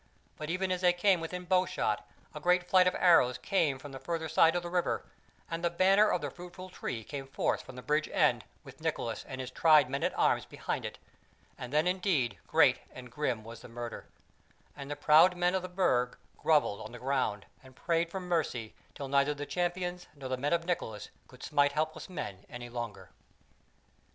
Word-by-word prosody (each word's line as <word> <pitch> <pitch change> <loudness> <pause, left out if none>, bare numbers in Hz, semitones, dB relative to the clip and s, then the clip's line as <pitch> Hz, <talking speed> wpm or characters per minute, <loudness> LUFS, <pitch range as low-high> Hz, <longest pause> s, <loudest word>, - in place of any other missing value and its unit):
But 155 0 -6
even 185 +2 -1
as 180 0 -1
they 180 -1 +5
came 180 +1 +3
within 180 +2 -5
bowshot, 180 - 0 0.3
a 150 - -6
great 180 +2 +2
flight 185 -1 +5
of 180 - +1
arrows 165 -9 +5
came 155 -8 +1
from 140 +2 -10
the 135 - -8
further 165 0 -3
side 160 +2 +4
of 175 - -1
the 175 - -5
water, 180 -1 0 0.4
and 165 +1 -4
the 170 - +3
banner 195 +4 +4
of 180 - 0
the 145 -2 -4
Fruitful 180 +1 -10
Tree 115 -9 -5
came 135 +3 -7
forth 135 - -1
from 130 - -12
the 125 - -9
bridge 150 +1 +1
end - - +3 0.2
with - - -14
Nicholas - - -2
and 130 - -7
his 130 0 -5
tried 150 -3 +5
men 140 - -2
at - - -1
arms - - +2
behind - - -4
it; - - -6 0.6
and 125 0 -8
then 150 +3 +2
indeed 180 - 0
great - - +4
and 125 -1 -11
grim 125 -5 -2
was 115 +1 -10
the - - -11
murder, 120 0 -7 0.7
and 140 -1 -8
the 145 - -3
proud 160 +5 +5
men 175 +1 +2
of 190 - +1
the 185 - -6
Burg 125 -10 +1 0.2
grovelled 150 -10 +2
on 110 +2 -8
the - - -7
ground 125 -6 -1 0.2
and 130 -1 -17
prayed 170 +2 0
for 190 - -4
mercy 160 -11 -2 0.2
till 140 - -5
neither 140 +2 +2
the 145 0 -5
Champions 175 +1 -2
nor 135 -2 -7
the 130 - 0
men 140 +3 -2
of 170 -1 +1
Nicholas 110 - -3 0.2
could 125 -1 -15
smite 145 -1 +2
helpless 155 +4 -2
men 100 - -6
any 120 -1 -8
longer. 115 -7 -6
155 Hz, 205 wpm, -31 LUFS, 130-180 Hz, 0.7 s, they